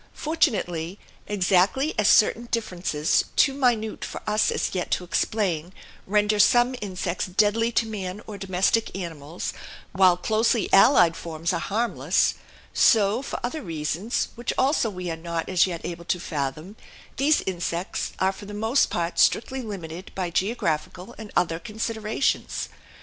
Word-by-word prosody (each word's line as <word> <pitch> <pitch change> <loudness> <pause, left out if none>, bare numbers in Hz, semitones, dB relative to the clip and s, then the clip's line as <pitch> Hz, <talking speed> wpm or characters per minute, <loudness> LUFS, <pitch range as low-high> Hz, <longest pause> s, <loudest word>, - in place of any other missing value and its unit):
Fortunately, 205 - -1 0.3
exactly 200 - +2
as 210 - +2
certain 230 +2 +4
differences 175 -8 0
too 275 - +4
minute 240 -5 0
for - - -5
us 210 +1 +2
as - - -1
yet 180 -2 -2
to - - 0
explain 180 -3 -1 0.3
render 210 +1 +2
some 245 +3 +5
insects 185 -3 -3
deadly 210 +5 +2
to 230 - +2
man 200 -3 -5
or 215 - -8
domestic 195 +2 0
animals, 165 -3 -5 0.4
while 185 -2 +4
closely 220 +4 +1
allied 195 -6 +6
forms 165 +1 -3
are - - 0
harmless, 230 +4 +1 0.4
so, 215 +1 +4
for 275 - -5
other 275 +6 -3
reasons, 165 - -2
which 240 +1 -3
also 265 -3 +2
we 180 -3 -5
are - - -3
not 165 0 -4
as 185 0 +3
yet 170 -3 -5
able 170 0 -6
to 180 - 0
fathom, 155 +5 -4 0.4
these 295 +3 +3
insects 175 -1 -3
are 190 0 +2
for 200 +1 -11
the 205 - -7
most 225 +6 +2
part 170 0 -2
strictly 265 +3 +2
limited 185 -6 -7
by 180 -2 -2
geographical 185 0 -2
and 215 -2 -9
other 165 -2 +1
considerations. 220 +2 -2
195 Hz, 145 wpm, -25 LUFS, 175-225 Hz, 0.4 s, allied